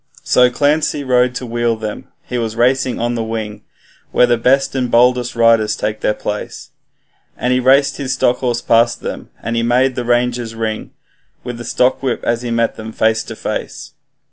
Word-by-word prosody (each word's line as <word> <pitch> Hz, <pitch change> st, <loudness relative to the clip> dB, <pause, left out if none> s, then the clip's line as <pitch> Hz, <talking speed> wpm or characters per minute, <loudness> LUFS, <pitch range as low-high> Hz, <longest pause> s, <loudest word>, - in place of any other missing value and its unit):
So 125 Hz, 0 st, +4 dB
Clancy 145 Hz, +2 st, +1 dB
rode 125 Hz, -1 st, +2 dB
to 125 Hz, -, -4 dB
wheel 120 Hz, 0 st, 0 dB
them 110 Hz, -1 st, -6 dB, 0.2 s
he 125 Hz, -, -4 dB
was 110 Hz, -1 st, -3 dB
racing 125 Hz, +1 st, +1 dB
on 120 Hz, +1 st, -1 dB
the 115 Hz, -1 st, -2 dB
wing 110 Hz, -2 st, -5 dB, 0.5 s
Where -, -, +5 dB
the 120 Hz, -1 st, +2 dB
best 130 Hz, +4 st, +2 dB
and 130 Hz, -2 st, -1 dB
boldest 125 Hz, +1 st, +3 dB
riders 115 Hz, -2 st, +3 dB
take 110 Hz, 0 st, -3 dB
their 105 Hz, -, +1 dB
place, 105 Hz, 0 st, -6 dB, 0.7 s
And 125 Hz, +1 st, 0 dB
he 125 Hz, -, +2 dB
raced 135 Hz, +2 st, +3 dB
his 135 Hz, -2 st, -2 dB
stock 125 Hz, -1 st, +2 dB
horse 120 Hz, -2 st, -2 dB
past 115 Hz, +1 st, +2 dB
them, -, -, -6 dB
and 115 Hz, -, -2 dB
he 115 Hz, -, +1 dB
made 125 Hz, +3 st, +2 dB
the 125 Hz, -, -3 dB
ranges 120 Hz, -1 st, 0 dB
ring 110 Hz, -1 st, -3 dB, 0.5 s
With 125 Hz, -1 st, -6 dB
the -, -, -6 dB
stockwhip, 125 Hz, +1 st, 0 dB
as 115 Hz, 0 st, 0 dB
he 120 Hz, -, -4 dB
met 115 Hz, 0 st, 0 dB
them 110 Hz, 0 st, -7 dB
face 110 Hz, 0 st, +1 dB
to -, -, -7 dB
face. -, -, -5 dB
120 Hz, 190 wpm, -17 LUFS, 115-125 Hz, 0.7 s, Where